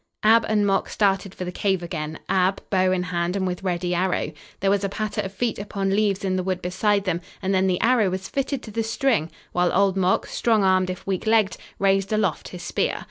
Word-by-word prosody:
Ab 225 +1 +5
and 210 -1 +2
Mok 195 -1 +1
started 195 -2 0
for 180 - -5
the 180 - -4
cave 190 -1 0
again, 160 -3 -4
Ab, 190 +1 +2
bow 185 -1 +3
in 185 -1 +1
hand 175 0 -1
and 190 -1 0
with 180 -1 -3
ready 180 -1 -1
arrow. 180 +1 0 0.3
There 195 0 +2
was 200 0 +1
a 200 - 0
patter 215 +1 -2
of 190 - -5
feet 225 +2 -2
upon 200 -1 -2
leaves 200 -2 +1
in 185 -1 0
the - - 0
wood 185 -1 -1
beside 200 +3 +1
them 180 -3 -1 0.2
and 195 0 -1
then 190 0 +3
the 180 -1 +1
arrow 230 -3 +3
was 190 +1 -4
fitted 275 -1 -2
to 215 - -9
the 225 +2 -1
string, 225 - 0 0.2
while 180 0 +2
Old 195 -1 +3
Mok, 185 -1 +2
strong 220 -3 +1
armed 185 -1 +3
if 185 - -6
weak 195 +2 -2
legged, 220 -4 +3 0.2
raised 195 0 +2
aloft 210 -7 0
his 180 -1 -9
spear. - - -1
195 Hz, 230 wpm, -24 LUFS, 185-205 Hz, 0.3 s, Ab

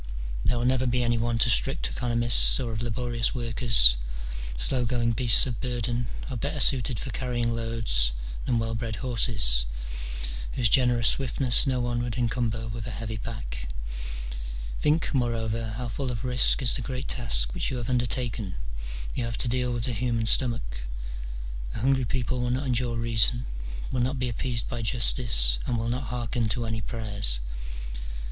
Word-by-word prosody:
There 120 - +2
will 120 - -1
never 130 0 +2
be 125 0 +1
any 120 -1 +1
want 115 0 +2
of 120 - +3
strict - - +1
economists 120 - +3
or 120 -3 -3
of 110 - -3
laborious 120 +1 0
workers: 115 - +5 0.6
slow 125 - +2
going 120 0 +1
beasts 115 0 +6
of 125 -3 -4
burden 120 -1 -2 0.2
are 130 - -5
better 145 +6 -3
suited 130 -2 +3
for 130 - -5
carrying 120 -2 -1
loads 115 - +1 0.4
than 120 - +2
well 115 0 -1
bred 115 -1 -3
horses, 105 - +4 0.9
whose 120 -3 +2
generous 120 -2 +4
swiftness 130 0 +1
no 130 -1 +1
one 120 -1 -1
would 120 -1 -3
encumber 115 -2 -1
with 115 0 -5
a 110 -5 -5
heavy 110 0 -4
pack. - - -6 1.1
Think, 155 +3 +1
moreover, 115 -3 -1
how 125 0 -3
full 130 +3 -3
of 120 0 -4
risk 125 +2 +4
is 120 - +3
the 130 - -2
great 130 +2 -4
task - - +2
which - - -2
you 130 - -3
have 120 -1 -4
undertaken: 120 -5 -1 0.6
you 125 - -2
have 115 -1 -3
to - - +2
deal 125 +1 +1
with 120 -1 -2
the 125 - -1
human 115 0 -1
stomach: 115 - +1 1.0
a - - -3
hungry 130 0 +2
people 125 +2 -2
will 125 - -1
not 130 +3 -1
endure 120 -2 0
reason, 115 +2 +3 0.5
will 125 - 0
not 130 +3 0
be 125 -1 -1
appeased 120 -1 -2
by 120 - -4
justice, 105 - +3
and 120 - 0
will 115 0 -2
not 125 +2 -2
hearken 120 -1 -2
to 120 +1 -1
any 110 0 -2
prayers. 105 - 0
120 Hz, 170 wpm, -27 LUFS, 115-125 Hz, 1.1 s, beasts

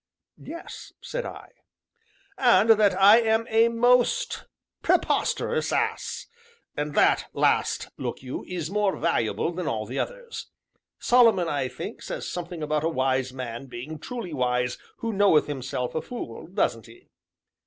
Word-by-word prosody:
"Yes," 335 +2 -9
said - - -4
I. - - -10 0.9
"And 225 - +5
that 205 -3 +4
I 205 +4 +8
am 225 0 +2
a 225 +1 +5
most 245 - +2 0.3
preposterous - - +1
ass! - - -1 0.5
and 150 0 -3
that - - +3
last, - - +1
look - - -4
you, 130 - -5
is 175 -2 -4
more 205 -1 +1
valuable 115 +8 0
than 175 -2 -4
all 110 -6 -2
the 125 +5 -4
others. - - -5 0.5
Solomon, 230 -8 +4
I 140 -4 -1
think, - - -7
says - - -5
something 175 -2 -5
about 150 0 0
a 165 - +2
wise 130 -3 0
man 125 0 -6
being 130 +6 -7
truly 230 - -6
wise 125 -2 0 0.2
who 230 -1 -3
knoweth 195 -6 +4
himself 130 -3 -4
a 160 - -1
fool, 195 - -7
doesn't 165 - -1
he?" 115 - -18
170 Hz, 145 wpm, -26 LUFS, -, 0.9 s, I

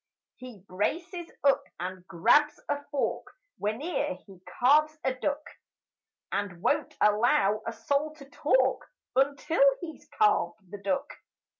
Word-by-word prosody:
He 240 -7 -11
braces 340 - -3
up 275 -1 +4 0.2
and 185 +1 -6
grabs 290 - +3
a 290 0 -2
fork 285 -2 -2 0.3
Whene'er 285 +6 -1
he 190 -3 -15 0.2
carves 305 +5 +4
a 265 - +1
duck 285 +3 -2 0.9
And 200 -4 -2
won't 295 - 0
allow 210 -1 +3
a - - -1
soul 280 +7 -1
to 280 -3 -13
talk 260 -2 +1 0.3
Until 280 +4 +1 0.2
he's 320 -3 -9
carved 195 - +1
the 205 - -7
duck. 195 -2 -1
260 Hz, 125 wpm, -28 LUFS, 205-295 Hz, 0.9 s, up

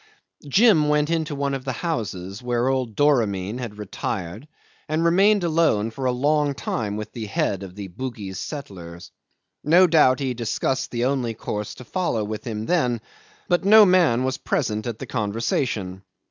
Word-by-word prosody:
Jim 165 - +4
went 150 +1 +2
into 160 -2 -1
one 140 0 -1
of 135 -1 -4
the 130 -1 -3
houses, 100 - -3
where 125 +1 0
old 130 -5 -1
Doramin 115 -7 +1
had 115 -4 -6
retired, 105 - -5 0.4
and 155 +2 0
remained 195 +4 +4
alone 155 -10 +2
for 130 +4 -5
a 125 - +3
long 145 +3 +1
time 105 -5 -3
with 105 - -6
the 110 -3 -6
head 100 -1 -1
of 95 -2 -9
the 100 -1 -6
Bugis 100 -2 -6
settlers. 90 - -8 0.5
No 175 +5 +6
doubt 150 -7 +4
he 135 -2 -1
discussed 125 +2 -2
the 120 -1 -1
course 105 -1 -5
to - - -11
follow 170 - -1
with 105 +3 -5
him 110 -1 -4
then, 125 -9 +1 0.5
but 175 0 +1
no 215 +2 +8
man 170 -10 +3
was 130 0 -2
present 110 +1 -1
at 115 -2 -4
the - - -7
conversation. 105 -3 -2
125 Hz, 165 wpm, -23 LUFS, 105-150 Hz, 0.5 s, no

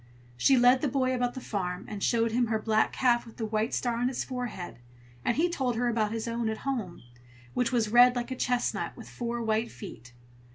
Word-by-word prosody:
She 265 - +4
led 250 +1 +5
the 295 - +1
boy 260 0 +1
about 245 -1 -1
the - - -4
farm, 180 -6 -3
and 210 -2 -6
showed 230 +1 +2
him 240 +1 +2
her 220 0 +1
black 220 0 +1
calf 240 -2 +2
with 230 - -14
the 225 - -2
white 220 +2 -1
star 240 -2 -1
on 245 +1 +1
its 260 - -2
forehead, 245 - -5 0.4
and 240 - 0
he 335 +3 +3
told 265 -8 -1
her 245 +2 0
about 220 -2 0
his 225 0 -3
own 230 -1 -1
at 220 - -3
home, 220 - -3 0.5
which 245 -2 0
was 230 -4 +1
red 245 +2 +7
like 240 +1 -3
a - - -2
chestnut, 250 -1 -1
with - - -10
four 235 -1 -4
white 220 +1 0
feet. 120 -1 -10
235 Hz, 220 wpm, -29 LUFS, 220-250 Hz, 0.5 s, red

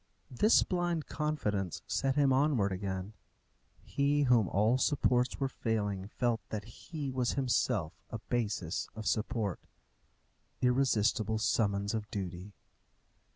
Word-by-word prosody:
This 210 - +5
blind 175 -3 -1
confidence 105 - -2
set 135 -1 0
him 140 -2 +4
onwards 130 -8 +2
again. 95 +1 -4 0.7
He 145 +1 +1
whom 120 -6 +4
all 110 +6 +2
supports 125 -3 +2
were 135 - +1
failing 105 -6 -2
felt 115 +1 -1
that 105 -2 -4
he 140 +5 -6
was 125 -2 0
himself 115 - 0 0.2
a 115 - -4
basis 105 -7 -2
of 110 -1 -6
support. 105 -3 -1 1.0
Irresistible 115 -4 +2
summons 100 -2 +1
of 110 -2 -3
duty! 95 0 -6
115 Hz, 115 wpm, -32 LUFS, 100-135 Hz, 1.0 s, This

